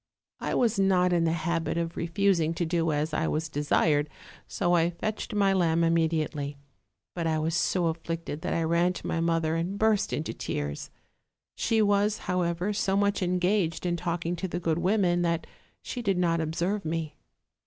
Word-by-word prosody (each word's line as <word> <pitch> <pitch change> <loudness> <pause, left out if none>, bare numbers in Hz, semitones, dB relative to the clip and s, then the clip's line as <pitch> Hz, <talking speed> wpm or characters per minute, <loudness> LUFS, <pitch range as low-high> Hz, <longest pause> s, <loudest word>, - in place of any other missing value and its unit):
I - - -2
was 230 -4 +2
not 180 -2 +3
in 170 -1 +2
the 165 - +2
habit 165 -1 -1
of 170 0 -2
refusing 170 -1 +1
to 170 - -1
do 165 -1 0
as 150 +1 -1
I 155 +1 0
was 160 +1 -1
desired, 150 0 +1 0.4
so 175 -3 -1
1 170 -1 +4
fetched 215 +4 -4
my 200 -2 +3
lamb 170 -3 +2
immediately; 160 -3 0 0.6
but 170 -2 -2
I 160 -1 +1
was 160 +1 -1
so 175 +1 +1
afflicted 165 -1 -3
that - - -2
I 165 - +1
ran 170 +2 +2
to - - -8
iny 165 - -1
mother 165 -1 +1
and 175 +4 -2
burst 215 -1 +2
into 155 - -2
tears: 75 0 -4 0.6
she 225 -1 +1
was, 205 +1 +2
however, 180 +1 0
so 195 -1 0
much 200 0 +1
engaged 180 -1 0
in 175 -1 +1
talk 170 0 -3
ing 170 +1 0
to 190 - -3
the 175 0 -3
good 165 -1 0
women 180 -2 +2
that 170 -1 0 0.4
she 245 - -5
did 195 -5 0
not 170 -2 +2
observe 175 +6 -1
me. 160 -1 -3
170 Hz, 185 wpm, -28 LUFS, 165-190 Hz, 0.6 s, 1